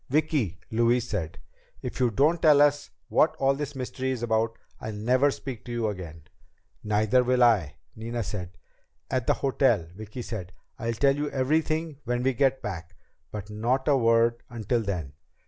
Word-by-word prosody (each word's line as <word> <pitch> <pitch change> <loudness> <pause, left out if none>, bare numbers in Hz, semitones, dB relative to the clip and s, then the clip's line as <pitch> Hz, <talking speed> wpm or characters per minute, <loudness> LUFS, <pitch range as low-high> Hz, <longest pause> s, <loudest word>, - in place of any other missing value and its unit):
"Vicki," 140 - 0
Louise 120 +1 +2
said, 85 -8 -3 0.5
"if - - -5
you 125 -2 +3
don't 150 +9 +2
tell 150 -3 +6
us 145 0 +3 0.2
what 155 - +3
all 135 0 +2
this 145 0 -5
mystery 130 0 -3
is 125 -3 -2
about, 115 0 0 0.2
I'll 110 - -5
never 125 +7 +3
speak 135 -4 -6
to 120 - -7
you 115 -2 0
again." 85 -6 -7 0.6
"Neither 110 +4 +3
will 125 0 +3
I," 100 -11 +3 0.2
Nina 115 +1 -3
said. 95 -3 -6 0.5
"At 130 -3 -1
the - - +4
hotel," 130 - +2
Vicki 110 +4 -7
said. 90 -7 -6 0.3
"I'll 115 -2 -1
tell 135 +4 +3
you 145 0 -2
everything 155 +2 0
when 120 +1 -1
we 135 +1 +2
get 135 +1 +1
back. 90 -3 -6 0.3
But 105 0 -7
not 120 +6 0
a 145 - +5
word 115 -1 +3
until 120 0 -1
then." 90 -10 -4
120 Hz, 170 wpm, -27 LUFS, 105-135 Hz, 0.6 s, tell